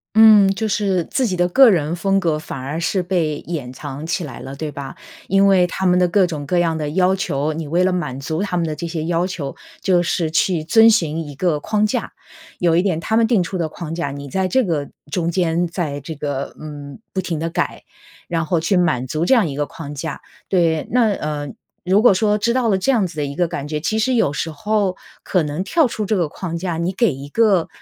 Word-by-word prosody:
嗯， 215 Hz, -3 st, +8 dB
就 220 Hz, +2 st, -1 dB
是 200 Hz, -4 st, 0 dB
自 260 Hz, -2 st, 0 dB
己 190 Hz, -, -1 dB
的 175 Hz, 0 st, +3 dB
个 260 Hz, +8 st, +7 dB
人 165 Hz, -4 st, +1 dB
风 195 Hz, +2 st, +1 dB
格 165 Hz, -5 st, 0 dB
反 150 Hz, -3 st, -7 dB
而 140 Hz, +5 st, -4 dB
是 180 Hz, +2 st, 0 dB
被 170 Hz, -5 st, 0 dB
掩 150 Hz, -7 st, -4 dB
藏 145 Hz, +2 st, -7 dB
起 165 Hz, -, -1 dB
来 135 Hz, -6 st, -8 dB
了， 135 Hz, -, -8 dB
对 150 Hz, +1 st, -5 dB
吧？ 140 Hz, -1 st, -7 dB, 0.3 s
因 195 Hz, 0 st, +4 dB
为 190 Hz, -2 st, +4 dB
他 190 Hz, +2 st, -3 dB
们 180 Hz, 0 st, +4 dB
的 180 Hz, -, +4 dB
各 190 Hz, +2 st, +3 dB
种 150 Hz, -5 st, -5 dB
各 180 Hz, -, +1 dB
样 170 Hz, -2 st, +2 dB
的 150 Hz, -1 st, -2 dB
要 185 Hz, +3 st, +3 dB
求， 155 Hz, -5 st, -1 dB
你 160 Hz, 0 st, -5 dB
为 170 Hz, +5 st, +2 dB
了 185 Hz, 0 st, +2 dB
满 150 Hz, -7 st, -3 dB
足 155 Hz, +5 st, -3 dB
他 200 Hz, -3 st, -1 dB
们 170 Hz, -, 0 dB
的 155 Hz, -1 st, -3 dB
这 170 Hz, +3 st, -5 dB
些 165 Hz, -2 st, -3 dB
要 170 Hz, +1 st, 0 dB
求， 160 Hz, -7 st, -5 dB, 0.3 s
就 180 Hz, -2 st, +3 dB
是 170 Hz, -2 st, -1 dB
去 165 Hz, 0 st, +1 dB
遵 225 Hz, +8 st, +6 dB
循 165 Hz, -7 st, +1 dB
一 145 Hz, -, -9 dB
个 160 Hz, 0 st, 0 dB
框 210 Hz, +6 st, 0 dB
架， 215 Hz, -, -2 dB, 0.5 s
有 170 Hz, -2 st, +2 dB
一 170 Hz, -, +4 dB
点 180 Hz, -4 st, 0 dB
他 220 Hz, +6 st, -1 dB
们 230 Hz, -1 st, +4 dB
定 220 Hz, -6 st, +3 dB
出 180 Hz, +2 st, -4 dB
的 165 Hz, -2 st, -1 dB
框 165 Hz, 0 st, -7 dB
架， 165 Hz, -3 st, -2 dB
你 140 Hz, 0 st, -7 dB
在 185 Hz, +7 st, -1 dB
这 260 Hz, +7 st, +2 dB
个 155 Hz, -8 st, -2 dB, 0.2 s
中 170 Hz, +1 st, 0 dB
间 175 Hz, -1 st, +1 dB
在 165 Hz, -5 st, -3 dB
这 160 Hz, +4 st, -7 dB
个， 140 Hz, -2 st, -4 dB
嗯， 145 Hz, -1 st, -9 dB
不 190 Hz, -, -1 dB
停 170 Hz, -3 st, -3 dB
地 165 Hz, +1 st, -3 dB
改， -, -, -2 dB, 0.4 s
然 165 Hz, -2 st, -1 dB
后 170 Hz, +1 st, +1 dB
去 180 Hz, +4 st, +1 dB
满 130 Hz, -9 st, +1 dB
足 155 Hz, +6 st, -2 dB
这 265 Hz, -, +5 dB
样 220 Hz, -8 st, +3 dB
一 140 Hz, -, -5 dB
个 145 Hz, 0 st, -1 dB
框 145 Hz, -3 st, -8 dB
架， 145 Hz, +1 st, -5 dB, 0.3 s
对。 165 Hz, -4 st, +1 dB
那， 235 Hz, -3 st, +3 dB
呃， 150 Hz, -5 st, -4 dB, 0.4 s
如 190 Hz, +3 st, +4 dB
果 225 Hz, -5 st, +6 dB
说 210 Hz, +2 st, +2 dB
知 235 Hz, +3 st, +1 dB
道 250 Hz, -1 st, +1 dB
了 195 Hz, -3 st, +2 dB
这 270 Hz, -, +2 dB
样 225 Hz, -7 st, +2 dB
子 175 Hz, -2 st, -7 dB
的 150 Hz, -, 0 dB
一 140 Hz, 0 st, -6 dB
个 175 Hz, +2 st, +1 dB
感 145 Hz, -3 st, -5 dB
觉， 150 Hz, 0 st, -2 dB
其 215 Hz, +8 st, -1 dB
实 255 Hz, +3 st, +1 dB
有 220 Hz, -11 st, +2 dB
时 160 Hz, -, -2 dB
候 195 Hz, +4 st, -1 dB, 0.2 s
可 180 Hz, -3 st, +1 dB
能 150 Hz, +4 st, -3 dB
跳 320 Hz, -, +2 dB
出 230 Hz, -3 st, -3 dB
这 215 Hz, -, +1 dB
个 170 Hz, -3 st, +1 dB
框 170 Hz, +2 st, -5 dB
架， 170 Hz, -1 st, -3 dB
你 170 Hz, +2 st, -1 dB
给 230 Hz, -, +2 dB
一 135 Hz, +2 st, -8 dB
个， 200 Hz, -2 st, +3 dB
170 Hz, 265 characters per minute, -20 LUFS, 150-195 Hz, 0.5 s, 嗯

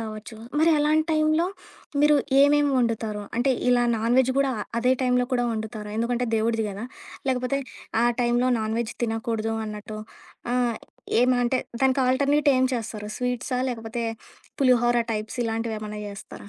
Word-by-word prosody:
కావచ్చు, 220 Hz, 0 st, -7 dB, 0.2 s
మరి 330 Hz, -, +5 dB
అలాంటి 310 Hz, +1 st, +3 dB
టైంలో 310 Hz, +2 st, +2 dB, 0.6 s
మీరు 300 Hz, 0 st, +6 dB, 0.3 s
ఏమేమి 290 Hz, 0 st, +4 dB
వండుతారు? 220 Hz, -3 st, -1 dB
అంటే 260 Hz, +2 st, +3 dB, 0.2 s
ఇలా 245 Hz, -1 st, +4 dB
నాన్‌వెజ్ 245 Hz, +3 st, +3 dB
గూడా 275 Hz, -1 st, +2 dB, 0.3 s
అదే 250 Hz, +2 st, +3 dB
టైంలో 250 Hz, 0 st, +2 dB
కూడా 245 Hz, -1 st, +2 dB
వండుతారు, 215 Hz, -1 st, -5 dB
ఎందుకంటే 240 Hz, +2 st, 0 dB
దేవుడిది 225 Hz, 0 st, 0 dB
గదా! 200 Hz, +4 st, -6 dB, 0.4 s
లేకపోతే 255 Hz, +1 st, 0 dB, 0.5 s
ఆ -, -, +4 dB, 0.2 s
టైంలో 240 Hz, +1 st, +2 dB
నాన్‌వెజ్ 220 Hz, +1 st, -2 dB
తినకూడదు 225 Hz, 0 st, -2 dB
అన్నట్టు 215 Hz, 0 st, -7 dB, 0.6 s
ఆహ్, 245 Hz, -2 st, +1 dB, 0.4 s
ఏం 250 Hz, +1 st, +4 dB
అంటే 250 Hz, +2 st, +1 dB, 0.2 s
దానికి 265 Hz, 0 st, +3 dB
ఆల్‌టర్‌నేట్ 285 Hz, +3 st, +2 dB
ఏం 255 Hz, -, +3 dB
చేస్తారు, 215 Hz, -2 st, -5 dB
స్వీట్సా 250 Hz, +1 st, -2 dB
లేకపోతే 230 Hz, 0 st, -4 dB, 0.6 s
పులిహోర 240 Hz, -2 st, +4 dB, 0.2 s
టైప్స్ 215 Hz, +3 st, -4 dB
ఇలాంటివేమన్నా 220 Hz, -2 st, -3 dB
జేస్తారా? 200 Hz, 0 st, -10 dB
240 Hz, 135 wpm, -25 LUFS, 220-255 Hz, 0.6 s, మీరు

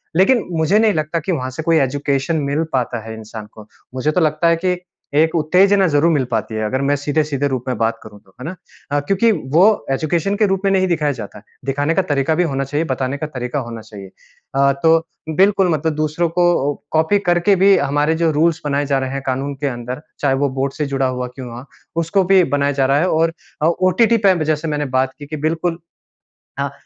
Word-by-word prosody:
लेकिन 200 Hz, +6 st, +4 dB
मुझे 165 Hz, +5 st, +2 dB
नहीं 220 Hz, -2 st, +3 dB
लगता 155 Hz, +1 st, -1 dB
कि 165 Hz, +4 st, -3 dB
वहाँ 130 Hz, -7 st, -2 dB
से 145 Hz, +5 st, -6 dB
कोई 165 Hz, 0 st, +3 dB
एजुकेशन 140 Hz, +3 st, 0 dB
मिल 140 Hz, +3 st, 0 dB
पाता 125 Hz, -2 st, -1 dB
है 110 Hz, -, -6 dB
इंसान 110 Hz, 0 st, -9 dB
को। 105 Hz, -1 st, -13 dB, 0.3 s
मुझे 130 Hz, +4 st, 0 dB
तो 180 Hz, -, +1 dB
लगता 155 Hz, +1 st, +2 dB
है 170 Hz, -, +4 dB
कि 180 Hz, -1 st, +1 dB, 0.4 s
एक 160 Hz, 0 st, +2 dB
उत्तेजना 185 Hz, +5 st, +4 dB
ज़रूर 155 Hz, +2 st, +3 dB
मिल 145 Hz, -4 st, +2 dB
पाती 110 Hz, -, -2 dB
है 110 Hz, -, -2 dB
अगर 130 Hz, +5 st, -1 dB
मैं 140 Hz, +1 st, +2 dB
सीधे-सीधे 145 Hz, 0 st, -1 dB
रूप 130 Hz, -3 st, -3 dB
में 125 Hz, -3 st, -1 dB
बात 115 Hz, +1 st, 0 dB
करूँ 105 Hz, -1 st, -13 dB
तो, 95 Hz, -, -26 dB
है -, -, -6 dB
ना? 175 Hz, +4 st, -5 dB, 0.4 s
अ, 145 Hz, -, +2 dB
क्योंकि 195 Hz, +10 st, +2 dB, 0.2 s
वो 175 Hz, -, +7 dB, 0.3 s
एजुकेशन 165 Hz, +7 st, 0 dB
के 215 Hz, +1 st, +2 dB
रूप 190 Hz, -1 st, 0 dB
में 195 Hz, -, +3 dB
नहीं 190 Hz, -1 st, +2 dB
दिखाया 155 Hz, -4 st, +1 dB
जाता 110 Hz, -7 st, -8 dB
है 105 Hz, -, -14 dB, 0.2 s
दिखाने 145 Hz, +3 st, 0 dB
का 190 Hz, -, +3 dB
तरीका 145 Hz, -2 st, 0 dB
भी 175 Hz, -, +2 dB
होना 135 Hz, -5 st, -1 dB
चाहिए, 145 Hz, +4 st, -2 dB
बताने 130 Hz, -1 st, -2 dB
का 155 Hz, -, -4 dB
तरीका 125 Hz, -1 st, -4 dB
होना 115 Hz, -3 st, -7 dB
चाहिए। 105 Hz, -3 st, -11 dB, 0.5 s
अ, 140 Hz, 0 st, +4 dB
तो 165 Hz, 0 st, +4 dB, 0.3 s
बिल्कुल 195 Hz, -1 st, +4 dB
मतलब 160 Hz, 0 st, 0 dB
दूसरों 155 Hz, +3 st, 0 dB
को 170 Hz, -4 st, +2 dB, 0.2 s
कॉपी 160 Hz, +6 st, +2 dB
करके 175 Hz, +3 st, +3 dB
भी 195 Hz, +1 st, +5 dB
हमारे 145 Hz, +1 st, +1 dB
जो 165 Hz, -, +3 dB
रूल्स 160 Hz, +2 st, +1 dB
बनाए 145 Hz, 0 st, 0 dB
जा 140 Hz, -1 st, +1 dB
रहे 130 Hz, -1 st, -3 dB
हैं 135 Hz, 0 st, -3 dB
कानून 135 Hz, +2 st, -2 dB
के -, -, +2 dB
अंदर 125 Hz, +1 st, -5 dB, 0.2 s
चाहे 140 Hz, -2 st, +1 dB
वो 140 Hz, -, +2 dB
बोर्ड 135 Hz, 0 st, -1 dB
से 150 Hz, -, -2 dB
जुड़ा 135 Hz, -1 st, 0 dB
हुआ 125 Hz, -1 st, -3 dB
क्यों 130 Hz, -2 st, -7 dB
हुआ, 120 Hz, +2 st, -9 dB, 0.3 s
उसको 170 Hz, +4 st, +1 dB
भी 190 Hz, -1 st, +6 dB
बनाया 145 Hz, -1 st, 0 dB
जा -, -, +4 dB
रहा 135 Hz, +1 st, +3 dB
है 175 Hz, -, +1 dB
और 165 Hz, +1 st, +1 dB, 0.3 s
ओ -, -, +5 dB, 0.2 s
ओटीटी 230 Hz, +5 st, +3 dB
पे 190 Hz, -, +5 dB
जैसे 155 Hz, +1 st, -1 dB
मैंने 150 Hz, -1 st, -1 dB
बात 130 Hz, 0 st, 0 dB
की 145 Hz, -, -8 dB
कि 155 Hz, +2 st, -6 dB
बिल्कुल 165 Hz, +1 st, -2 dB, 0.8 s
हाँ। 140 Hz, 0 st, -1 dB
150 Hz, 225 wpm, -18 LUFS, 135-170 Hz, 0.8 s, वो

